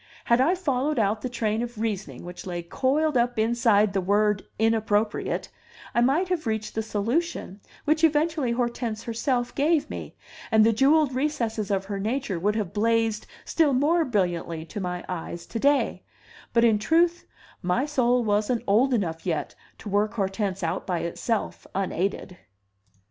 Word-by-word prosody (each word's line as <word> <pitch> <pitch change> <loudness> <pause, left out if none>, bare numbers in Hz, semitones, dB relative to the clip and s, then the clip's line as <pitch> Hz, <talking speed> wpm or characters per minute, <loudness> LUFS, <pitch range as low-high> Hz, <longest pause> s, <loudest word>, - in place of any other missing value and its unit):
Had 235 +1 +4
I 330 +8 +3
followed 295 -4 -1
out 215 0 +1
the 255 - -3
train 225 -2 -1
of 240 -2 -5
reasoning 210 -5 -3
which 175 +1 -8
lay 175 -1 -4
coiled 280 - 0
up 245 0 +1
inside 220 -2 +3
the 195 - +1
word 205 +2 +2
inappropriate, 220 -1 0 0.4
I 235 - +3
might 295 +9 +2
have 335 -8 -1
reached 220 -1 -2
the 220 - -1
solution 220 - -2 0.2
which 310 +2 +2
eventually 305 -4 +2
Hortense 235 -2 -2
herself 245 +1 -1
gave 300 +1 +1
me, - - -7 0.3
and 220 -1 +5
the 225 - +4
jewelled 275 +4 +4
recesses 235 -6 -1
of 195 -1 0
her 200 0 -4
nature 220 -2 -2
would 205 +4 +1
have 205 -6 -2
blazed 225 0 +1 0.2
still 310 -4 +2
more 310 +6 +3
brilliantly 175 - -1
to 205 - -7
my 180 -2 -4
eyes 170 -1 -5
to 230 - -5
day; 285 +3 +2 0.5
but 235 - +3
in 220 -3 +4
truth, 335 +9 +2 0.3
my 180 +10 +1
soul 250 -4 +2
wasn't 215 +3 +1
old 245 +6 +3
enough 165 -7 -2
yet 165 -4 -2 0.2
to - - -11
work 205 +2 0
Hortense 195 -2 -2
out 165 - -2
by 180 -3 -1
itself, 215 +6 -3
unaided! 190 -1 -2
225 Hz, 160 wpm, -25 LUFS, 200-260 Hz, 0.5 s, and